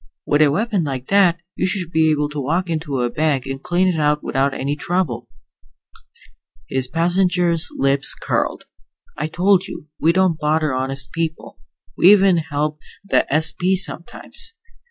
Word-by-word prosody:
With 145 +1 +2
a 150 - +6
weapon 205 +4 0
like 130 -3 -5
that, 190 -4 +4 0.2
you - - 0
should 185 -3 -3
be 160 -1 +3
able 150 -1 +1
to 150 0 -5
walk 170 +6 -1
into 150 -5 -2
a 120 - 0
bank 150 -4 0
and 135 0 -5
clean 180 +4 +1
it 175 -3 0
out 150 0 +1
without 135 +1 0
any 140 +2 -3
trouble." 145 -8 -2 1.4
His 130 -1 -1
passenger's 175 +2 +1
lips 135 0 +1
curled. - - -2 0.5
"I 150 - -3
told 185 +3 +2
you, 150 - -9
we 165 - +3
don't 185 -2 +1
bother 155 -1 +1
honest 130 0 -3
people. 165 -1 -4 0.4
We 185 - +6
even 195 -3 +5
help 150 -1 -2 0.3
the - - +1
S.P. 170 +5 +1
sometimes. 190 - -1
160 Hz, 155 wpm, -20 LUFS, 145-180 Hz, 1.4 s, a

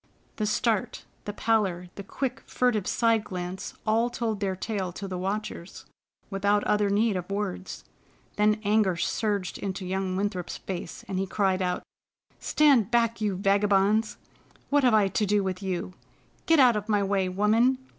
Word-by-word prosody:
The 215 - 0
start, 215 -1 0 0.2
the 205 - -4
pallor, 195 -6 0
the - - -8
quick, 255 +6 -4
furtive 230 -6 +1
side 230 -2 +2
glance, 180 -1 -6
all 225 +2 +2
told 230 -3 -2
their 195 -2 -1
tale 190 -2 -3
to 195 +2 -6
the 185 -1 -4
watchers, 195 -2 -5 0.5
without 200 +1 +1
other 210 -1 +2
need 210 +1 +2
of 180 0 -4
words. 195 -2 -4 0.5
Then 210 +1 +3
anger 205 -3 +2
surged 200 0 -1
into 190 -1 -4
young 190 0 -2
Winthrop's 190 -2 -2
face, 180 -3 -7
and 190 -1 -2
he 195 - -1
cried 190 -1 +1
out: 180 -1 -1 0.6
"Stand 275 -9 +3
back, 230 -1 +1
you 205 -3 0
vagabonds! 200 +2 +2 0.5
What 290 0 +4
have 245 -3 +5
I 210 -2 +4
to 210 - 0
do 205 0 +2
with 185 0 -3
you? 185 -1 -3 0.5
Get 325 - +5
out 250 -4 +6
of 210 +1 -4
my 205 -1 +2
way, 195 -1 0
woman! 220 +7 +3
205 Hz, 165 wpm, -27 LUFS, 190-220 Hz, 0.6 s, out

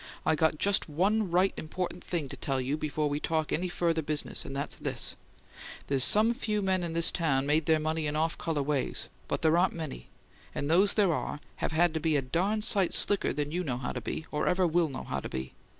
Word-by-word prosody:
"I - - +3
got 160 0 +2
just 200 0 +2
one 195 +6 +1
right 180 +3 +3
important 175 +3 -4
thing 165 -5 -3
to - - -6
tell 135 -2 -2
you 130 +3 -1
before 155 0 -1
we 145 0 -1
talk 155 -1 -1
any 180 +3 -1
further 165 -2 0
business; 150 -1 -2
and 135 - -7
that's 140 - -3
this: - - 0 0.7
there's 135 -2 +3
some 220 - +5
few 215 -4 -2
men 190 -1 +1
in 170 -1 -3
this 170 0 +2
town 140 -6 +1
made 150 +2 +1
their 160 -1 +5
money 155 0 -1
in 150 - -2
off 160 +2 0
colour 155 -4 -2
ways, 145 -1 -2 0.2
but - - -2
there 160 +1 +4
aren't 185 +1 +2
many; 155 - -6 0.5
and 145 +2 -2
those 195 +4 +4
there 200 -5 +3
are 150 - -3 0.2
have - - -2
had 170 +1 +3
to 160 - -1
be 160 0 +1
a 140 - +2
darn 190 +11 0
sight 200 -5 +3
slicker 205 - +2
than 145 +1 -3
you 180 +3 -1
know 130 -7 -2
how 125 - -3
to - - -5
be, 160 - -4
or 150 - -1
ever 185 0 +3
WILL 170 -1 +2
know 130 - -6
how - - -3
to - - -6
be! 65 0 -5
160 Hz, 235 wpm, -29 LUFS, 150-180 Hz, 0.7 s, some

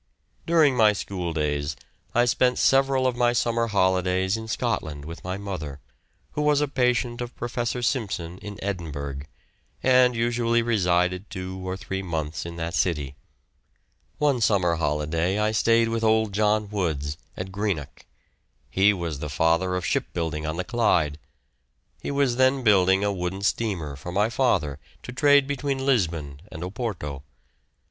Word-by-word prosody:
During 160 -5 +4
my 110 -3 +5
school 90 -4 -4
days 75 -1 -1 0.4
I 120 +1 +5
spent 125 +1 +2
several 135 -1 +3
of 130 -1 +1
my 120 0 +2
summer 115 -1 +1
holidays 95 -1 +1
in 110 0 -6
Scotland 75 -8 -2
with 85 +1 -8
my 90 +1 -3
mother, 90 -9 -6 0.5
who 150 - -2
was 150 -1 +3
a 150 - +1
patient 125 -2 0
of 120 0 -6
Professor 120 0 -3
Simpson 95 - -2
in 105 -1 -8
Edinburgh, 75 -8 -4 0.6
and 125 -1 +5
usually 115 0 +1
resided 90 -4 +1
two 95 0 -6
or 95 0 -3
three 95 +1 -4
months 80 -3 -3
in 85 - -7
that 85 0 -4
city. 75 -8 0 1.0
One 145 -5 +2
summer 90 -6 +2
holiday 80 +4 0
I 105 0 +1
stayed 115 +1 +3
with 115 0 -2
old 110 -2 +2
John 105 0 +1
Woods, 80 -8 -2 0.2
at 95 0 -5
Greenock. 95 -7 -3 0.7
He 100 +2 +4
was 85 -6 -4
the 75 - -4
father 85 +5 +1
of 90 -2 -2
shipbuilding 80 -2 -2
on 80 +1 -3
the 90 - -1
Clyde. 85 -10 +1 0.8
He - - -4
was 140 -4 +1
then 130 0 +3
building 95 -2 +4
a 100 0 +1
wooden 95 +1 -4
steamer 95 -10 -1
for 70 +6 -7
my 105 +5 +1
father 75 - +1 0.2
to - - -7
trade 145 +1 +5
between 135 -1 -2
Lisbon 80 - 0
and 80 - -7
Oporto. 90 - -4
100 Hz, 155 wpm, -25 LUFS, 85-120 Hz, 1.0 s, my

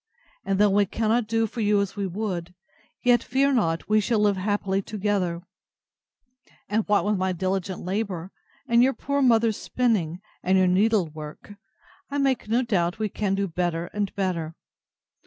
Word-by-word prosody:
And 195 - 0
though 205 0 +4
we 200 0 +3
cannot 225 +2 0
do 225 0 +1
for 225 +2 -5
you 205 -1 +3
as 200 -1 -2
we 200 -2 -2
would, 180 -3 -4 0.5
yet, 245 -1 +4
fear 275 +2 +1
not, 165 -9 0
we 215 0 +3
shall 225 +2 +1
live 210 -1 +3
happily 195 0 -1
together; 195 -4 -2 1.2
and 215 +2 +1
what 205 -1 +2
with 210 -1 +1
my 185 0 0
diligent 190 +1 -2
labour, 190 -2 -3 0.4
and 235 -1 +4
your 265 +2 +4
poor 280 +1 -2
mother's 230 -4 +3
spinning, 200 -10 0 0.2
and 190 +1 +2
your 185 - +4
needle 195 +2 +3
work, 155 +5 -10 0.6
I 285 - -3
make 270 -5 +1
no 240 +3 +2
doubt 180 -7 0
we 215 -2 -2
shall 200 -2 0
do 200 0 -1
better 175 -1 -2
and 205 -2 -1
better. 170 -5 -2
205 Hz, 170 wpm, -25 LUFS, 185-225 Hz, 1.2 s, though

